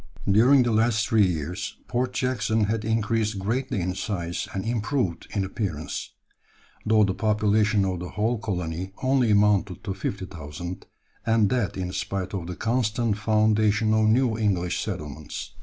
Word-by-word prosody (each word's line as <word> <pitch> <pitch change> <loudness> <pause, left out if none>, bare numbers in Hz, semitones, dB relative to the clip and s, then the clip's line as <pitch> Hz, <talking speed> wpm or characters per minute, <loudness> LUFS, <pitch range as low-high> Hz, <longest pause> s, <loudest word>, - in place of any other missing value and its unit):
During 125 +7 +6
the 120 - 0
last 110 -1 +2
three 110 -3 +4
years 85 0 -4
Port 125 +1 -1
Jackson 115 -4 0
had 105 +1 -1
increased 110 -1 0
greatly 110 +2 -1
in 90 +1 -1
size 90 -4 -3
and 95 -1 -4
improved 115 - -1
in 100 -2 -1
appearance; 90 -7 -4 0.7
though 110 0 +4
the 95 -2 +1
population 105 -1 +2
of 90 -2 -2
the 90 0 -6
whole 110 +2 0
colony 90 -2 -3
only 130 -2 +3
amounted 100 -3 +2
to 100 - -3
50,000, 90 -3 -6 0.4
and 110 -3 +3
that 120 -9 0
in 90 -1 -3
spite 95 0 -3
of 90 -4 -4
the 90 - -5
constant 115 -1 0
foundation 110 0 +2
of 110 0 +3
new 115 +1 +3
English 90 -5 0
settlements. 75 0 -6
105 Hz, 150 wpm, -25 LUFS, 95-110 Hz, 0.7 s, During